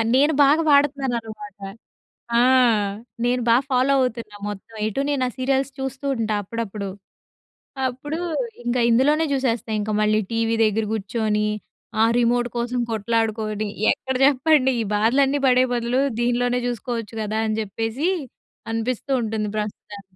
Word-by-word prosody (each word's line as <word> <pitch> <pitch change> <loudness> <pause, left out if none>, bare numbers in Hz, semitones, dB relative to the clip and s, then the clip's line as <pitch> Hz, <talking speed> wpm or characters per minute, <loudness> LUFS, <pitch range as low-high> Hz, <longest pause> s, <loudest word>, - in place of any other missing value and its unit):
నేను 290 +4 +4
బాగా 290 +4 +4
వాడుతున్నాననమాట. 235 -8 0 0.8
ఆ! - - +5 0.8
నేను 245 +1 +1
బా 230 - +6
ఫాలో 260 +1 +3
అవుతున్నా 230 -4 -3
మొత్తం. 205 +2 -10
ఎటు 220 +5 -2
నేను 275 -3 +1
ఆ - - -5
సీరియల్స్ 270 +1 0
చూస్తూ 265 +1 -4
ఉంటా 220 -2 -1
అప్పుడప్పుడు. 210 -1 -5 1.0
అప్పుడు 290 +6 -5 0.4
ఇంక 240 +1 -1
ఇందులోనే 290 +7 +3
చూసేస్తా. 245 -4 -1
ఇంక 210 +1 -2
మళ్ళీ 215 0 +3
టీవీ 230 0 +1
దగ్గర 220 0 +1
కూర్చొని, 210 0 -1 0.5
ఆ - - +7
రిమోటు 240 0 +2
కోసం 240 +1 -1
కొట్లాడుకొని 220 -1 -1 0.2
ఎక్కడ 265 0 -3
చెప్పండి? 275 0 +4
"ఈ - - 0
బాధలన్నీ 265 +7 +3
పడే 255 0 +5
బదులు 240 +2 0 0.2
దీనిలోనే 245 +1 +1
చూసుకోవచ్చు 235 -2 -4
గదా!" 215 +1 -2
అని 215 0 -1
చెప్పేసి, 225 - -2 0.6
అనిపిస్తూ 230 +4 -2
ఉంటుంది 220 -1 -2
ప్రస్తుతానికి. 210 -1 -6
235 Hz, 130 wpm, -22 LUFS, 215-260 Hz, 1.0 s, ఆ